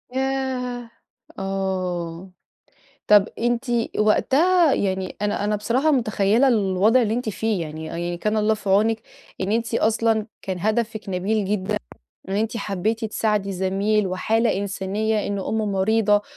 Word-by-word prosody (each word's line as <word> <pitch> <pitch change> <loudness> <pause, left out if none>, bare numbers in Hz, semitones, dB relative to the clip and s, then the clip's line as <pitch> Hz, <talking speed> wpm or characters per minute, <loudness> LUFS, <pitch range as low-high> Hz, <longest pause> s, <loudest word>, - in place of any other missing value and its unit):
ياه! 260 -3 -2 0.5
آه. 185 -2 -3 0.8
طب 210 0 +6
أنتِ 240 +1 0 0.3
وقتها 305 +10 +4
يعني 190 -1 -2
أنا 205 0 0
أنا 210 0 +1
بصراحة 250 +9 +1
مُتخيّلة 225 -1 +2
الوضع 215 +1 +3
اللي 220 -1 0
أنتِ 240 -1 -2
فيه. 215 0 -1
يعني 155 0 -6
آه - - -4
يعني 175 0 -3
كان 210 +5 -1
الله 215 +1 +2
في 210 -2 -7
عونِك 220 +3 +3 0.4
إن 190 +2 -1
أنتِ 230 0 -1
أصلًا 220 -1 +2 0.2
كان 190 -2 -4
هَدفِك 215 +1 -1
نبيل 195 +3 0
جدًا. 190 -1 -1 0.5
إن 195 - -1
أنتِ 225 +2 -1
حبّيتِ 215 +3 -2
تساعدي 210 -2 0
زميل، 195 +3 +1
وحالة 220 +5 +1
إنسانية، 200 +2 -1
إن 200 0 -2
أمُّه 215 +3 -1
مريضة، 205 +1 +2
210 Hz, 140 wpm, -23 LUFS, 195-225 Hz, 0.8 s, طب